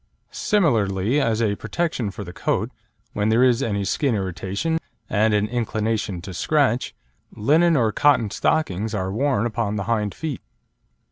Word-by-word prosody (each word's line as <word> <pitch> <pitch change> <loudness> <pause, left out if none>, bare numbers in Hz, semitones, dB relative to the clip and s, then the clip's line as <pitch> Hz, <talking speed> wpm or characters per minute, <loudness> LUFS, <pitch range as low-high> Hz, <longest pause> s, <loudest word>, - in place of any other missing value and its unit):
Similarly 120 - +1
as 115 -1 +1
a 105 -2 +1
protection 130 -1 -2
for 100 +1 -7
the 90 -2 -9
coat, - - -1 0.4
when 105 +1 0
there 115 +3 +4
is 125 0 +3
any 100 -5 -1
skin 120 +5 +1
irritation 100 - -2 0.3
and 110 +1 +2
an 105 0 +1
inclination 110 -5 -2
to 95 - -7
scratch, 130 - +1 0.4
linen 160 +8 +3
or 115 -4 +2
cotton 130 -4 +3
stockings 110 - 0
are 95 -1 -2
worn 125 -1 +1
upon 110 -2 -1
the 100 - -2
hind 105 -2 -1
feet. 155 -4 -4
110 Hz, 150 wpm, -23 LUFS, 100-135 Hz, 0.4 s, there